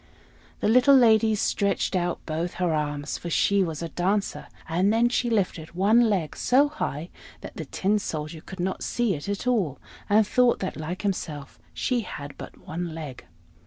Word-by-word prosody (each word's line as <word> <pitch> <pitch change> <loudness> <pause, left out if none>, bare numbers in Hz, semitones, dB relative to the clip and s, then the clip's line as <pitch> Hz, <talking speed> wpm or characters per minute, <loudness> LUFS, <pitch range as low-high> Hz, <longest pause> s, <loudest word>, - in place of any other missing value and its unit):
The - - +1
little 255 +5 +6
lady 225 -3 +5
stretched 200 -1 0
out 175 -1 -1
both 165 +2 -3
her 180 -3 0
arms, 145 -1 -2
for 170 - -6
she 200 +4 +3
was 165 -3 -2
a 165 - -4
dancer; 195 +5 -1 0.2
and 180 +5 +2
then 230 +2 +3
she 240 0 0
lifted 180 -7 -1
one 220 +5 +4
leg 180 -7 -1
so 280 +4 +3
high 170 - -4 0.3
that - - -9
the - - -5
Tin 205 +2 0
Soldier 155 -3 -5
could 190 +2 -11
not 185 +2 -2
see 240 -4 0
it 150 +4 -5
at 200 +3 -3
all, 205 - +1 0.3
and 210 +1 +5
thought 250 +3 +3
that, 190 - -4
like 160 +5 -5
himself, 155 -8 -4
she 250 -2 0
had 145 -9 -7
but - - -9
one 170 0 -5
leg. 145 - -8
190 Hz, 180 wpm, -26 LUFS, 160-220 Hz, 0.3 s, little